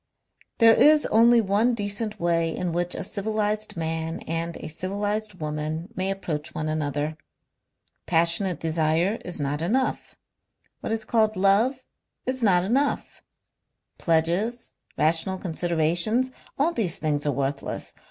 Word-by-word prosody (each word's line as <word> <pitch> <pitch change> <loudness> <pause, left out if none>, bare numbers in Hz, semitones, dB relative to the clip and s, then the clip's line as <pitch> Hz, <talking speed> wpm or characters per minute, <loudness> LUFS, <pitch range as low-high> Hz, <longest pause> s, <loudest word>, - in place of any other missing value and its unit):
"There 225 -1 +7
is 300 +5 +5
only 230 +1 +6
one 215 +4 +2
decent 210 0 -3
way 165 -1 +1
in 180 -1 -2
which 175 +1 0
a - - -4
civilized 215 0 -2
man 160 0 -3
and 165 +1 -3
a - - -7
civilized 205 +5 -3
woman 155 +2 -4
may 185 +1 -1
approach 165 -6 -4
one 155 - -2
another. 150 0 -2 0.9
Passionate 170 +2 +2
desire 165 +5 +1
is 175 - -6
not 145 +1 -2
enough. 255 +10 -1 0.6
What - - -4
is 220 -1 -1
called 220 -1 +2
love 215 +8 +2 0.4
is 255 0 -2
not 180 -5 +4
enough. 270 +9 -1 0.8
Pledges, 175 +9 0 0.3
rational 165 +5 +1
considerations, 175 +7 +1 0.3
all 300 +5 +2
these 195 - -1
things 150 -2 -1
are - - +3
worthless. 140 +1 -3
180 Hz, 130 wpm, -25 LUFS, 160-215 Hz, 0.9 s, There